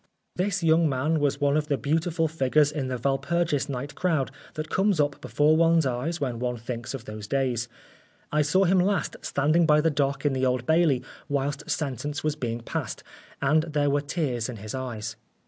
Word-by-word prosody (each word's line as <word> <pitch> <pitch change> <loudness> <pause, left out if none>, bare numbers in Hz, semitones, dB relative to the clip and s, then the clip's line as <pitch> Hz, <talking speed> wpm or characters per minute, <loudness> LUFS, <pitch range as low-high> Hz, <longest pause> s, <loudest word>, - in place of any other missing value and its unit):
This 190 0 -1
young 165 0 +4
man 145 +4 +1
was 145 -2 +1
one 145 0 +2
of 150 -1 0
the 140 -2 +1
beautiful 165 +3 0
figures 150 -1 +2
in 145 -3 -3
the 130 -1 -2
Walpurgis 140 +3 0
night 140 +2 -4
crowd 160 -8 0 0.2
that 155 0 -4
comes 195 -3 +2
up 145 -1 0
before 150 +1 +3
one's 165 -1 +4
eyes 135 +7 -2
when 125 -5 -2
one 125 0 -2
thinks 120 +2 -5
of 120 -3 -8
those 105 -1 -7
days. 125 -2 0 0.6
I 150 - +3
saw 170 +7 +3
him 190 0 +4
last 190 -1 +1
standing 155 +4 +2
by 150 -1 +5
the 160 +1 +2
dock 140 -1 -1
in 145 - +3
the 130 0 -1
Old 125 -1 +1
Bailey 160 -5 +3 0.3
whilst 140 0 -2
sentence 145 +1 -2
was 155 -1 0
being 120 -5 -3
passed, - - -4 0.4
and 155 +3 +4
there 150 -3 0
were 145 +1 +2
tears 140 -6 -2
in 125 - -5
his 105 0 -7
eyes. 115 -4 -5
145 Hz, 195 wpm, -26 LUFS, 130-160 Hz, 0.6 s, by